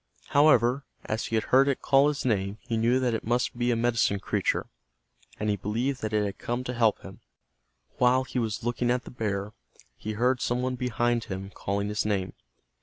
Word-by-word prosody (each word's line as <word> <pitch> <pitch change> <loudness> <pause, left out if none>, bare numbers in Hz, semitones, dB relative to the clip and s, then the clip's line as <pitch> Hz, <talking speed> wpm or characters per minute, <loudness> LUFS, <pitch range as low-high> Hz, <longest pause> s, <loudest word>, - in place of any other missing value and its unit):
However, 140 -3 +4 0.2
as 110 +1 -2
he 115 - -2
had 110 - +2
heard 135 +2 +6
it 140 - -1
call 135 +1 +5
his 150 -3 -2
name 100 -4 0
he 115 - -3
knew 120 +3 +2
that 125 -2 +1
it 110 - -2
must 120 +2 0
be 120 0 0
a 120 - +3
medicine 115 -3 +1
creature, - - 0 0.7
and 105 - -2
he 105 - +2
believed 120 +7 -2
that 110 - -2
it 105 -1 +1
had 100 - -5
come 120 +1 -2
to 125 - -4
help 115 -3 +2
him. - - -11 0.8
While 125 +1 +4
he 130 0 -3
was 110 -3 -2
looking 120 0 0
at 125 +1 +1
the - - -10
bear, 105 -3 -3 0.4
he 110 - -5
heard 125 +3 +1
some 125 +1 0
one 130 0 0
behind, 120 -2 0
him 95 +1 -6
calling 100 +1 -2
his 105 - -1
name. 100 -3 -1
120 Hz, 205 wpm, -27 LUFS, 105-125 Hz, 0.8 s, heard